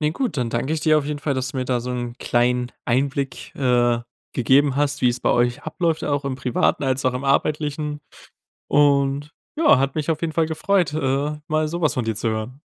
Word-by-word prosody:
Ne, 150 0 +1
gut, 250 - -2
dann 120 -3 -1
danke 125 +6 -1
ich 155 - -3
dir 155 -1 +4
auf 145 - -3
jeden 150 -1 -3
Fall, 145 -1 -1
dass 130 0 -2
du 130 - -8
mir 130 - -1
da 125 -1 0
so 125 - -5
'nen 120 -1 -4
kleinen 125 +1 +1
Einblick, 135 +2 -1
äh, 120 -3 +2 0.3
gegeben 135 +2 +3
hast, 145 0 0
wie's 125 0 +2
bei - - +1
euch 120 0 +1
abläuft, 165 0 -1
auch 145 -1 -1
im 130 -2 -2
Privaten 125 +2 0
als 130 0 0
auch 130 - +2
im 130 +2 -4
Arbeitlichen. 150 +1 0 0.7
Und 140 0 +2 0.2
ja, 305 - +5
hat 135 +1 0
mich 155 +1 -2
auf 155 - -3
jeden 160 -2 -2
Fall 165 0 +2
gefreut, 170 0 0
äh, 145 +1 0
mal 155 0 +1
so 170 +2 -4
was 155 - +2
von 125 -3 -1
dir 110 - -1
zu 110 +2 -1
hören. 110 +5 -4
140 Hz, 220 wpm, -22 LUFS, 125-150 Hz, 0.7 s, ja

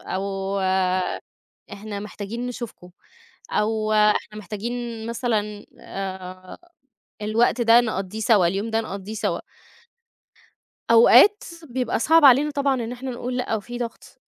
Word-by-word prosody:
أو 195 0 -3 1.1
إحنا 205 0 -6
محتاجين 210 +3 -6
نشوفكم 235 -7 -8 0.6
أو 215 0 0
إحنا 210 0 +2
محتاجين 225 +3 -5
مثلًا 220 -4 -2 0.2
آآ 185 -1 -7 0.6
الوقت 230 +3 +1
ده 230 +1 +6
نقضّيه 215 -2 -4
سَوا، 210 -5 +4
اليوم 200 +5 -2
ده 225 0 0
نقضّيه 200 -1 -7
سَوا. 220 - -2 1.5
أوقات 260 - +7 0.2
بيبقى 245 -2 -1
صعب 320 +5 +4
علينا 275 +3 +6
طبعًا 280 -2 0
إن 240 -1 -3
إحنا 255 +1 -6
نقول 245 +1 -4
لأ، 250 -3 -1
وفي 240 +3 -5
ضغط، 235 -2 -8
220 Hz, 115 wpm, -23 LUFS, 205-245 Hz, 1.5 s, أوقات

